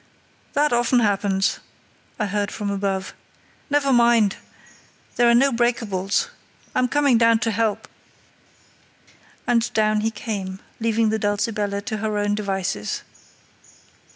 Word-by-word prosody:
"That 295 -2 +2
often 240 +1 +3
happens," 200 -2 +1 0.6
I 210 - +1
heard 205 0 -1
from 205 -2 -3
above. 195 -1 -2 0.6
"Never 280 -2 +2
mind! 235 -4 +4 0.8
There 240 0 +4
are 235 - +5
no 275 +3 +4
breakables. 225 -5 0 0.4
I'm 255 0 +2
coming 280 -3 +3
down 230 -1 +5
to 225 - +1
help." 220 0 -1 1.6
And 235 -1 +1
down 215 -1 +2
he 220 - +1
came, 200 -4 -5 0.2
leaving 225 -1 +1
the 220 0 0
Dulcibella 205 -1 -1
to 220 0 -3
her 215 0 -2
own 205 0 0
devices. 195 - -2
215 Hz, 125 wpm, -22 LUFS, 200-235 Hz, 1.6 s, are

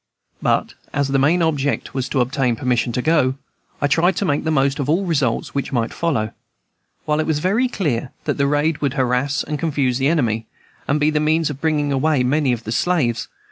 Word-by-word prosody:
But - - +1 0.2
as 140 -1 0
my 135 - +2
main 165 +6 +3
object 145 -3 -1
was 130 -1 -2
to 135 - +1
obtain 125 -1 0
permission 120 0 0
to 125 - -1
go, 150 -5 +2 0.4
I - - +1
tried 170 +5 +3
to 200 - -1
make 145 -2 0
the - - +1
most 135 -2 +1
of 140 0 -2
all 180 +5 +2
results 140 -9 0
which 140 - -2
might 120 -3 -1
follow, 115 -11 -1 0.7
while 150 0 +1
it 155 - 0
was 160 -2 +1
very 200 +11 +1
clear 140 - -2
that - - -2
the 140 - +3
raid 150 +2 +1
would 140 -3 0
harass 130 +1 0
and 150 -1 -4
confuse 140 -6 0
the 135 - +2
enemy, 115 -8 0 0.4
and 150 +2 +1
be 150 +1 +3
the 150 - +1
means 155 0 +1
of 140 - -9
bringing 150 -3 +1
away 140 0 +2
many 140 +1 +2
of 120 -2 -2
the 110 - -5
slaves. 130 -4 0
145 Hz, 215 wpm, -20 LUFS, 130-155 Hz, 0.7 s, main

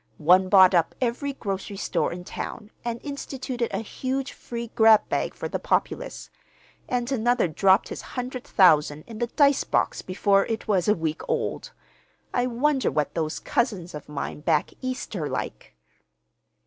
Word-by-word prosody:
One 180 +4 +4
bought 190 -2 +7
up 170 -2 +2
every 255 +3 -1
grocery 200 -4 -5
store - - -1
in 180 +1 -6
town 215 +4 -7
and 235 -1 -3
instituted 265 -4 -4
a - - -2
huge 265 +4 -3
free 235 -1 -7
grab 220 -2 +6
bag - - -1
for - - -4
the - - -3
populace; - - -2 0.6
and 245 +1 -1
another 240 -4 +2
dropped 190 +5 +3
his - - -6
hundred 250 0 -5
thousand 150 -5 +4
in 225 -2 -9
the 240 - 0
dice 280 +2 +3
box - - 0
before 195 +1 +2
it 225 0 -3
was 190 -5 +1
a 210 - +4
week 160 -1 -3
old. - - -2 0.6
I 245 0 +1
wonder 265 +3 +1
what 150 -1 -1
those 155 -2 -2
cousins 195 -8 -1
of 150 -1 -9
mine 150 0 -4
back 155 0 +1
East 255 -3 -4
are 155 -6 -2
like!" - - -5
220 Hz, 160 wpm, -25 LUFS, 180-250 Hz, 0.6 s, bought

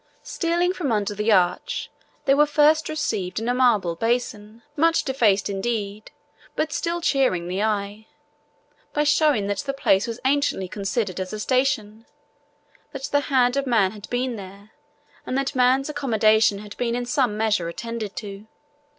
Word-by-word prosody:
Stealing 345 +1 0
from 320 -9 -2
under 205 -1 0
the 210 +2 0
arch, 180 -3 +1 0.3
they 275 - +4
were 295 +2 +4
first 305 +1 +3
received 215 -12 -2
in 225 - -4
a 245 - +2
marble 225 -9 +2
basin, 225 +1 -2
much 330 +2 +3
defaced 225 -7 +2
indeed, 205 0 -3 0.5
but 315 - -1
still 345 0 -2
cheering 255 - +1
the 185 +3 -2
eye, 210 0 -2 0.9
by 295 - +1
showing 290 -7 +3
that 205 0 -2
the 275 - -3
place 205 -8 +2
was 230 +1 -5
anciently 275 -8 +1
considered 195 0 -3
as 185 +2 -4
a 215 - -4
station, 225 -3 -1 0.9
that 275 -1 -7
the 285 - +4
hand 250 -2 +3
of 275 0 -1
man 215 -6 +3
had 210 0 -11
been 245 -1 -2
there 200 +2 -11 0.5
and 255 - -3
that 275 +1 -1
man's 255 +1 +3
accommodation 220 -7 +2
had 205 0 -10
been 235 -1 -1
in 245 0 -2
some 245 -4 0
measure 215 -6 0
attended 225 +2 -6
to. 205 -4 -8
230 Hz, 160 wpm, -23 LUFS, 205-270 Hz, 0.9 s, they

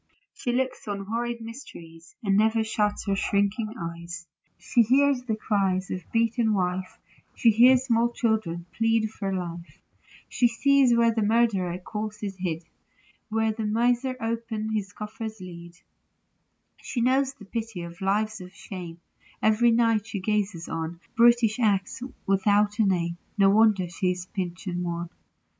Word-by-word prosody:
She 245 - -3
looks 255 -1 -2
on 200 -1 -4
horrid 235 +2 -3
mysteries, 170 -9 -11
And 195 -2 +2
never 220 +2 +3
shuts 210 -1 -1
her 200 -1 +1
shrinking 205 +3 0
eyes; 170 +1 -6 0.3
She 240 - +2
hears 265 +3 +3
the 240 -3 -2
cries 195 -3 0
of 185 - -2
the 175 - -24
beaten 230 -1 +2
wife; 185 0 -2 0.4
She 230 - +5
hears 245 +3 +6
small 235 -1 +2
children 215 -8 -1
plead 225 -1 +1
for 195 -3 -4
life; 175 -2 -5 0.5
She 245 - +2
sees 265 +1 +4
where 230 -1 +4
the 220 - 0
murdered 205 -5 +1
corse 210 0 -5
is 195 -2 -3
hid 170 -3 -3 0.7
Where 220 0 +1
the 215 0 -3
miser 245 +4 +1
opens 225 -1 -3
his 205 -2 -2
coffer's 220 +1 -7
lid; 170 -1 -10 1.1
She 245 - -4
knows 265 +3 +2
the 210 - -13
pity 220 -3 -5
of 170 +1 -10
lives 210 +2 0
of 180 +1 -11
shame; 175 -3 -8 0.4
Every 220 +2 +4
night 230 -2 +2
she 215 -3 -4
gazes 200 -4 -1
on 165 +1 -4 0.2
Brutish 235 -1 +4
acts 205 -1 +1 0.2
without 205 +2 +2
a 220 - +5
name: 170 -2 0
— - - -40
No 195 -1 +5
wonder 210 -3 +4
she 180 +2 -1
is 180 0 -3
pinched 180 -1 -4
and 180 -2 -2
wan. 170 0 -4
210 Hz, 155 wpm, -26 LUFS, 185-230 Hz, 1.1 s, hears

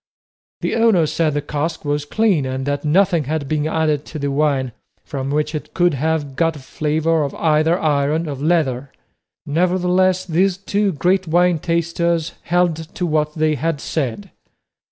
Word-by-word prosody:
The - - -1
owner 225 -8 +4
said 155 0 0
the 145 - -1
cask 155 +2 -3
was 145 0 -1
clean, 200 -2 +1
and 130 0 -3
that 145 0 -2
nothing 170 0 +2
had 150 0 -2
been 155 +1 0
added 155 -2 0
to 155 - -7
the 140 -1 -2
wine 140 -3 +1 0.3
from 135 -3 -4
which 150 +2 -1
it 155 - -6
could 175 -2 +3
have 145 -1 -1
got 165 +1 +1
a - - -9
flavour 155 +4 0
of 140 - -4
either 160 +2 +2
iron 150 +2 +1
or 145 - -3
leather. 140 -3 0 0.5
Nevertheless, 180 +3 +1
these 185 +2 +1
two 200 +1 0
great 180 +4 +1
wine 175 +1 +3
tasters 170 0 -1
held 175 -2 +2 0.2
to 180 - -1
what 150 -2 0
they 155 -1 +2
had 155 +1 -1
said. 120 -10 -3
155 Hz, 165 wpm, -19 LUFS, 145-175 Hz, 0.5 s, owner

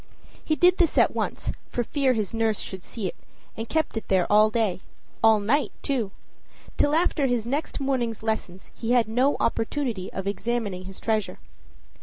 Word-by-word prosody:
He 310 - +1
did 360 +3 +4
this 340 -3 +2
at - - +5
once, - - -2 0.2
for 240 - -1
fear 270 +1 +1
his 215 -4 -2
nurse 225 -2 +1
should 190 -1 -6
see 220 -4 -6
it, 180 - -3 0.4
and 225 +1 -5
kept 315 -5 0
it 225 - -4
there 190 -2 +3
all 215 +1 +6
day 215 -5 0 0.4
all 220 -1 +6
night, 255 +9 +1
too. 245 -8 0 0.7
Till 290 +1 +2
after 320 -4 +2
his 245 -3 0
next 285 +7 -2
morning's 250 -5 -1
lessons 220 -4 -3
he 235 +1 -1
had 240 -3 +4
no 250 +6 +2
opportunity 225 -4 -1
of 190 - -5
examining 200 -2 -2
his 190 0 -9
treasure. 220 -2 -1
225 Hz, 175 wpm, -25 LUFS, 210-270 Hz, 0.7 s, all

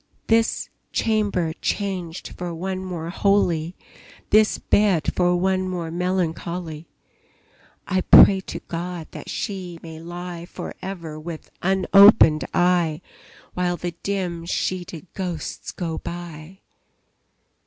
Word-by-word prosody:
This 225 0 +2 0.2
chamber 205 -7 0
changed 185 -4 -3
for 175 -1 -6
one 185 +2 -3
more 170 -3 -5
holy, 180 -4 +1 0.6
This 215 0 +5
bed 200 -6 +2
for 180 -1 +2
one 185 +1 +1
more 170 -3 -4
melancholy, 170 -2 -2 1.0
I 185 0 +1
pray 195 +1 +8
to - - -5
God 170 0 -5
that - - -9
she 185 -4 -4
may 160 -1 -9
lie 175 0 -7
For - - -7
ever 165 -5 -6
with 160 0 -8
unopened 190 -5 +6
eye, 175 -3 +2 0.5
While 180 -1 0
the 175 0 -3
dim 180 -4 -3
sheeted 175 -2 -3
ghosts 180 -5 -5
go 165 -3 -4
by! 175 +1 -8
175 Hz, 110 wpm, -23 LUFS, 165-190 Hz, 1.0 s, pray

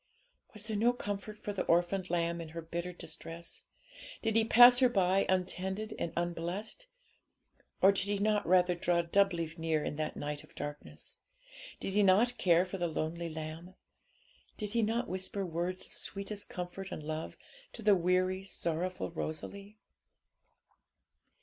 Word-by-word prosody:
Was 210 0 -6
there 220 -1 -3
no 235 +4 +3
comfort 205 -2 -5
for 205 - -5
the 195 - -1
orphaned 175 +2 +2
lamb 170 0 0
in 165 - -7
her - - -2
bitter 170 +2 -4
distress? 165 0 -7 0.6
Did 220 -1 +1
He 225 - +5
pass 245 +2 +8
her 255 -2 +5
by 195 -3 +2
untended 190 +3 -1
and 170 - -2
unblessed? 175 - -3 1.0
Or 195 - +9
did 195 -1 -1
He 205 0 0
not 210 0 +1
rather 180 0 +5
draw 175 0 +1
doubly 170 -2 +2
near 160 -2 0
in 145 - -3
that 155 0 -3
night 145 0 -4
of - - -19
darkness? 145 0 -7 0.6
Did 195 - -3
He 210 - +4
not 210 +6 +4
care 175 0 +4
for 190 +1 -6
the 175 - +1
lonely 165 +1 -3
lamb? 160 +3 -7 0.8
Did 210 -2 -4
He 235 - +2
not 225 +3 0
whisper 190 +1 -2
words 175 +2 -3
of - - -10
sweetest 200 +1 -4
comfort 180 +2 -6
and 155 - -5
love 155 +1 -4 0.4
to 225 - -8
the 210 -1 +6
weary, 185 +1 +2
sorrowful 180 -1 -2
Rosalie? 200 +6 -6
185 Hz, 155 wpm, -32 LUFS, 170-205 Hz, 1.0 s, Or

